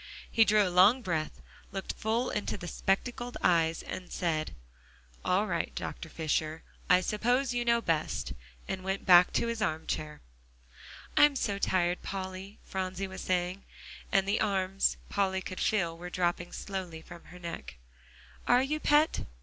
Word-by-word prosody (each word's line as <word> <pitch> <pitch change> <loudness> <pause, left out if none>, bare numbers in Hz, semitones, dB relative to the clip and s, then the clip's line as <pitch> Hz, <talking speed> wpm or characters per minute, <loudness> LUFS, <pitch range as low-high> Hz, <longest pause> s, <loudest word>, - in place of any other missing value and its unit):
He 225 -2 +5
drew 210 -2 +4
a - - -2
long 205 +8 +6
breath, 160 -5 -3 0.3
looked 195 0 -4
full 225 +3 -1
into 210 - -2
the 175 - -7
spectacled 240 +7 -1
eyes, 165 -2 +3
then 180 -1 -6
said, 155 -3 -2 0.7
"All - - +2
right, - - -2 0.3
Fisher; 155 0 -2 0.3
I 180 0 +6
suppose 245 +7 +1
you 240 0 0
know 235 0 +3
best," 155 - -1 0.3
and 190 -1 -4
went 190 +1 -2
back 180 -1 +7
to - - +1
his 230 -1 -3
arm 160 -6 -1
chair. 150 -1 -4 0.9
"I'm 295 -1 +6
so 200 -6 -1
tired, 180 -2 +1
Polly," 190 +1 -6
Phronsie 190 0 -3
was 190 -1 -8
saying, 180 +1 -1 0.5
and 195 0 +3
the 200 - +1
arms, 195 -2 +1
Polly 190 -2 0
could 185 0 -6
feel, 175 -6 +1
were 175 +1 -8
dropping 175 -1 -1
slowly 180 -5 -5
from 170 - -12
her 180 - -12
neck. 170 - -7 0.7
"Are 245 +1 +5
you, 305 +3 -1
Pet? 300 +1 +3
190 Hz, 155 wpm, -30 LUFS, 175-215 Hz, 0.9 s, back